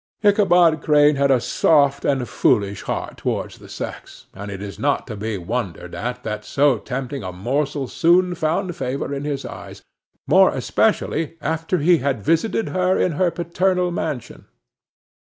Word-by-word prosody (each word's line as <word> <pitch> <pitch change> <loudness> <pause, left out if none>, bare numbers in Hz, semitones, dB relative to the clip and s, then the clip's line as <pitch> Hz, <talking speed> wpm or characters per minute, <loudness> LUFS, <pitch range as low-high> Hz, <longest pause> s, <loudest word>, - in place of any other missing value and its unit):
Ichabod 180 -6 +4
Crane 150 -1 +4
had 140 0 +2
a 130 -2 +4
soft 140 +2 +2
and 135 -3 0
foolish 100 -2 +1
heart - - -4
towards - - -3
the - - -14
sex; - - -8
and 100 +2 -8
it 100 -1 -6
is 100 0 -8
not 145 0 0
to 110 - -7
be 105 0 -3
wondered 95 -2 -4
at 125 +2 -4
that 105 -1 -4
so 135 +1 +2
tempting 135 +3 -5
a 95 -2 -5
morsel 135 +8 -2
soon 180 +6 +3
found 175 +2 -1
favor 135 +2 -3
in 140 +1 -4
his 140 -2 -3
eyes, - - -9 0.4
more - - +5
especially 165 +1 0
after 160 +3 -1
he 170 +2 +4
had 130 -5 -2
visited 165 +8 +1
her 185 0 +1
in 180 - +1
her 175 +3 +1
paternal 180 +1 0
mansion. 140 -7 -5
145 Hz, 160 wpm, -21 LUFS, 125-170 Hz, 0.4 s, more